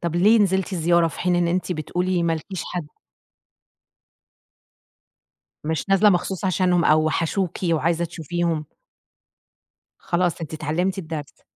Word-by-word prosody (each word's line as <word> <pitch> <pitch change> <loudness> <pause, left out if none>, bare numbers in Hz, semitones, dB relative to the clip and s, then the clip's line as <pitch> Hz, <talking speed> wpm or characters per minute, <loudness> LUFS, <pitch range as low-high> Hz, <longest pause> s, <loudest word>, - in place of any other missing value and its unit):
طَب 170 -1 -2
ليه 210 +6 +5
نزلتِ 190 -1 +1
الزيارة 170 -1 +3
في 150 - -9
حين 180 0 +1
إن 175 -1 +2
أنتِ 180 +1 -1
بتقولي 180 +3 -1
ما 170 -1 +1
لكيش 165 +2 -5
حد؟ 175 -4 -5 2.8
مش 160 +3 -2
نازلة 195 +2 +5
مخصوص 185 +1 -1
عشانهم 180 -1 +2
أو 155 0 +4
وحشوكِ 165 +4 -1
وعايزة 165 +1 +1
تشوفيهم. 165 -1 -2 1.3
خلاص 175 -1 -1
أنتِ 160 -1 -6
اتعلّمتِ 170 +5 -1
الدرس. 155 -5 -7
175 Hz, 125 wpm, -23 LUFS, 160-185 Hz, 2.8 s, ليه